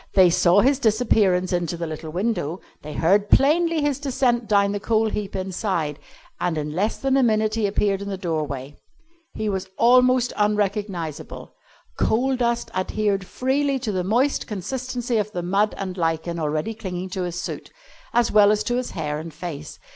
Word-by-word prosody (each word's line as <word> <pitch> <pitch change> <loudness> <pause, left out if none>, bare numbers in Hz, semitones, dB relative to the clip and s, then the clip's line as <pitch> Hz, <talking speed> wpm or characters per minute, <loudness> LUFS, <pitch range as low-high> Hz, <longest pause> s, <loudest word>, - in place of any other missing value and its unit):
They 185 -3 +6
saw 175 +3 +4
his 270 +3 +3
disappearance 210 -6 +2
into 175 -1 -1
the 170 - -3
little 160 0 -6
window, 180 -2 -2 0.2
they 150 0 -8
heard 200 +5 +2
plainly 325 +3 +4
his 290 -2 0
descent 255 -4 0
down 200 -2 +3
the 205 - -2
coal 220 +1 +1
heap 200 -2 -4
inside, 185 -5 -2 0.4
and 170 -3 -1
in 150 0 -3
less 200 +7 0
than 270 -1 0
a - - +4
minute 215 -3 +2
he 220 -2 +1
appeared 200 -1 0
in 200 - -5
the 195 - -3
doorway. 150 -6 -4 0.6
He 215 - -2
was 190 -2 -2
almost 250 0 +4
unrecognisable. 205 -6 -2 0.5
Coal 260 +4 +2
dust 235 -1 -1
adhered 195 0 -1
freely 275 +2 0
to 245 -4 -3
the 185 -2 -1
moist 245 +9 +1
consistency 245 +3 -3
of 210 0 -1
the 175 - -3
mud 200 +4 +1
and 190 -2 -4
lichen 165 0 -1
already 155 +7 -1
clinging 185 -4 -5
to 185 - -3
his 175 -1 -3
suit, 185 - -6 0.4
as 240 -1 +2
well 205 -1 +6
as 210 0 +1
to 245 - -1
his 255 - -2
hair 150 -2 -2
and 165 +1 -7
face. 155 -2 -7
200 Hz, 175 wpm, -23 LUFS, 175-235 Hz, 0.6 s, They